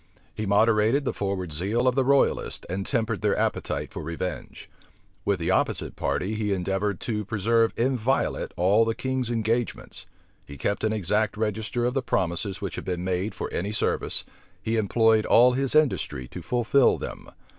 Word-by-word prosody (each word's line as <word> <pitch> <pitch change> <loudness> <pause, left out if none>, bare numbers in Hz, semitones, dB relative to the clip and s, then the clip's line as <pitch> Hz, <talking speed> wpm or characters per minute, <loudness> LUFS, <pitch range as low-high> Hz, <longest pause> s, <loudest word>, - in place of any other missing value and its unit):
He 110 -1 -4
moderated 110 +6 +3
the - - -1
forward 95 -5 -3
zeal 105 +10 0
of 125 - +4
the 135 +1 +2
royalists, 140 +1 +1
and 95 +2 -3
tempered 115 -5 -1
their 105 -1 +1
appetite - - -2
for - - -5
revenge. 85 +2 -5 0.6
With - - +1
the - - 0
opposite - - 0
party, 100 +4 -1
he 105 -2 -1
endeavored 95 +1 -1
to 105 -3 -2
preserve 115 +3 +2
inviolate 130 +1 0
all 100 +6 +4
the 115 0 -1
king's 130 -2 -2
engagements: 115 0 -2 0.4
he 70 - -11
kept 100 +9 -2
an 110 - +2
exact 105 +1 0
register 110 +2 -1
of 125 - 0
the 135 - 0
promises 95 -3 -2
which 100 - -4
had - - -6
been 90 -1 -3
made 95 +3 -2
for - - -5
any 100 +4 -2
service, 105 - 0 0.4
he 115 - -2
employed 110 0 +3
all 125 +2 +6
his 135 +2 -1
industry 135 - +1
to - - -8
fulfil 125 +2 +3
them. - - -7
110 Hz, 170 wpm, -26 LUFS, 95-120 Hz, 0.6 s, all